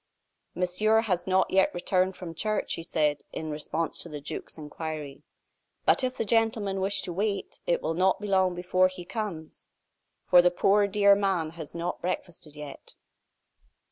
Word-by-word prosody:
"Monsieur 200 +5 +2
has 180 -5 -1
not 190 0 +2
yet 190 0 +4
returned 185 +1 +1
from 170 -3 -7
church," 215 +5 -2
she - - -1
said, 150 -3 0
in 155 -1 -5
response 155 +2 -3
to 170 - -5
the 150 -2 -6
duke's 145 - -7
inquiry; 150 -2 -6 0.6
"but - - +4
if 255 0 -1
the - - -1
gentlemen 215 -3 +1
wish 195 +2 +1
to 175 - -4
wait, 200 +2 -2
it 170 - +1
will 160 - 0
not 185 +2 +2
be 210 - -6
long 190 -2 +2
before 185 +1 +3
he 185 -1 -9
comes, 190 -5 -6 0.6
for 180 - +7
the 180 - +4
poor, 200 +3 +3
dear 200 0 +5
man 190 -6 0
has 160 -2 -9
not 170 +1 -3
breakfasted 170 -4 -5
yet." 150 -2 -10
180 Hz, 170 wpm, -28 LUFS, 165-200 Hz, 0.6 s, for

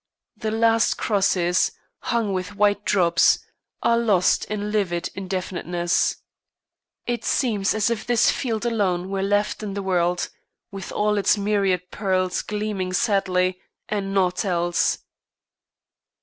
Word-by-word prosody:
The 220 0 -3
last 225 +1 +3
crosses, 185 -4 +1 0.3
hung 230 -4 -1
with 185 +2 -4
white 205 0 +2
drops, 170 -4 +4 0.5
are 235 0 +3
lost 205 -6 +2
in 210 0 -3
livid 185 -5 -1
indefiniteness. 180 -2 -1 0.9
It 240 -2 -2
seems 215 -7 +1
as 220 +2 +1
if 225 -2 -3
this 240 -2 +4
field 230 -3 -2
alone 190 -6 0
were 195 -1 -1
left 205 +2 0
in 200 -2 -5
the 200 - -3
world, 180 -1 0 0.4
with 195 -2 -7
all 210 0 +1
its 200 +1 +3
myriad 195 -3 0
pearls 185 -3 0
gleaming 205 -3 -3
sadly, 185 -2 +1 0.3
and 200 -2 -2
naught 185 -1 +1
else. 175 -3 +1
195 Hz, 125 wpm, -23 LUFS, 185-215 Hz, 0.9 s, drops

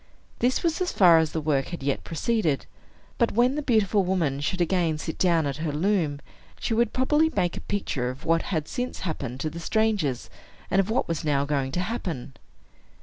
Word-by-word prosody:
This 250 +2 +1
was 335 +1 0
as 365 - 0
far 170 -4 +6
as 160 -1 0
the 160 - -2
work 145 -3 0
had 170 -6 -6
yet 140 0 -1
proceeded; 165 -3 0 0.5
but 235 - +2
when 240 +4 +3
the 300 - -2
beautiful 215 -6 +2
woman 170 -7 0
should 165 +6 -2
again 170 -2 +1
sit 160 +1 -5
down 170 -4 +3
at 140 -1 -2
her 155 -1 -2
loom, 155 -3 0 0.4
she - - -1
would 235 0 +2
probably 295 +5 +2
make 175 - +1
a - - -6
picture 140 -11 -2
of 130 +3 -8
what 165 0 +3
had 155 -5 -1
since 250 +1 -4
happened 135 -8 -4
to 155 - -1
the 170 - -7
strangers, 175 - 0 0.4
and 195 - +3
of 195 +1 +1
what 245 +4 +1
was 165 -1 -2
now 140 -2 +1
going 140 -2 -1
to 180 - 0
happen. 180 - -4
170 Hz, 205 wpm, -26 LUFS, 145-220 Hz, 0.5 s, far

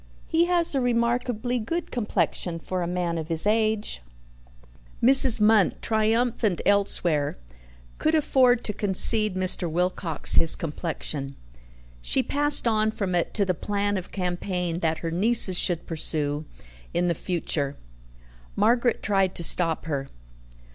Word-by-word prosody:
"He 330 +1 +1
has 345 -2 0
a 270 - 0
remarkably 245 0 -1
good 330 +10 -5
complexion 180 -6 -2
for 180 +2 -5
a 170 - -3
man 175 -1 -3
of 155 - -6
his 165 +1 +3
age." 215 - 0 1.0
Mrs. 260 -2 +6
Munt, 210 -2 +3
triumphant 220 -2 0
elsewhere, 175 - +1 0.6
could 310 +1 +1
afford 255 -5 +2
to 210 - -4
concede 210 +1 +1
Mr. 185 -2 0
Wilcox 175 -1 +2
his 165 - +5
complexion. 150 -3 -5 0.7
She - - 0
passed 290 -3 0
on 215 -1 +1
from 200 -4 -4
it 175 -1 -2
to 205 - +2
the 185 - 0
plan 205 +3 -2
of 185 -2 -6
campaign 180 -2 -3
that 160 -2 -1
her 165 - -3
nieces 195 +1 +4
should 175 -2 -1
pursue 155 -2 0 0.5
in 175 +1 +1
the 170 - +1
future. 155 -5 -3 0.8
Margaret 240 0 +1
tried 195 -3 0
to 170 - -3
stop 165 -1 +5
her. 140 -4 -4
190 Hz, 135 wpm, -24 LUFS, 170-225 Hz, 1.0 s, Mrs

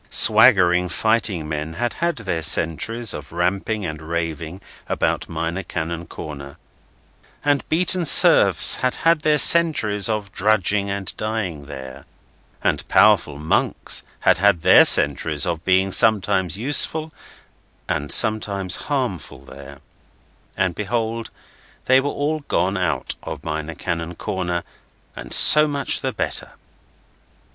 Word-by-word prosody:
Swaggering 95 -6 +4
fighting 110 -7 -2
men 75 +1 -6
had 120 +4 -3
had 170 0 -3
their 95 -7 -4
centuries 115 +9 0
of 75 -1 0
ramping 95 +4 -3
and 80 -2 -7
raving 80 +1 -6 0.3
about - - -3
Minor 85 +3 -5
Canon 85 -1 -7
Corner, 70 -2 -10 0.9
and 145 -1 -1
beaten 180 +2 +1
serfs - - +6
had 130 -1 -2
had 165 -1 +3
their 150 -1 +1
centuries 125 - +4
of 105 -2 -4
drudging 100 0 -1
and 100 -1 -4
dying 100 -10 -5
there, 65 -1 -11 0.6
and - - -2
powerful 70 - +2
monks 75 +2 -1 0.2
had - - +2
had 95 -4 +1
their - - +6
centuries 75 +1 +1
of 85 -2 -5
being 95 +1 0
sometimes 100 -4 +1
useful 150 +6 +1 0.7
and 75 +1 -4
sometimes 100 -5 +1
harmful 65 - -5
there, 70 +1 -14 0.8
and 95 -2 -1
behold 115 +3 -4 0.6
they 130 +1 +3
were 145 - -4
all 150 +3 -3
gone 95 +2 -1
out 90 -5 -3
of - - -9
Minor 80 +1 -6
Canon 85 +1 -6
Corner, 90 0 -5 0.5
and - - -11
so 150 0 +8
much 140 -1 -1
the - - -3
better. - - -5
95 Hz, 125 wpm, -19 LUFS, 80-115 Hz, 0.9 s, so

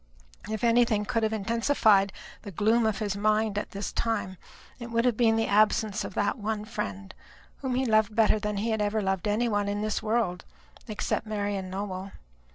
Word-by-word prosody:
If 220 0 -4
anything 230 -3 +3
could 230 +2 0
have 220 -1 +1
intensified 220 -2 +2 0.3
the 210 - -8
gloom 220 +5 +2
of 215 - 0
his 205 -3 -2
mind 215 +1 +1
at - - -6
this 200 +1 -5
time 225 -5 -2 0.4
it 235 -1 -7
would 230 +1 +1
have 245 -3 +3
been 225 -1 +3
the 225 0 +1
absence 215 0 +2
of 195 - -7
that 205 +4 0
one 215 0 -3
friend, 100 - -5 0.4
whom 260 -2 -2
he 260 +1 +1
loved 215 -2 +2
better 220 -1 +4
than 210 -1 -3
he 225 +3 -1
had 220 -1 0
ever 210 +1 0
loved 190 +1 -1
any 215 +4 +1
one 205 -2 0
in 205 +1 -2
this 215 -1 -1
world, 215 -5 0 0.4
except 215 0 -2
Marian 205 -3 -2
Nowell. 190 0 -5
215 Hz, 190 wpm, -27 LUFS, 200-225 Hz, 0.4 s, better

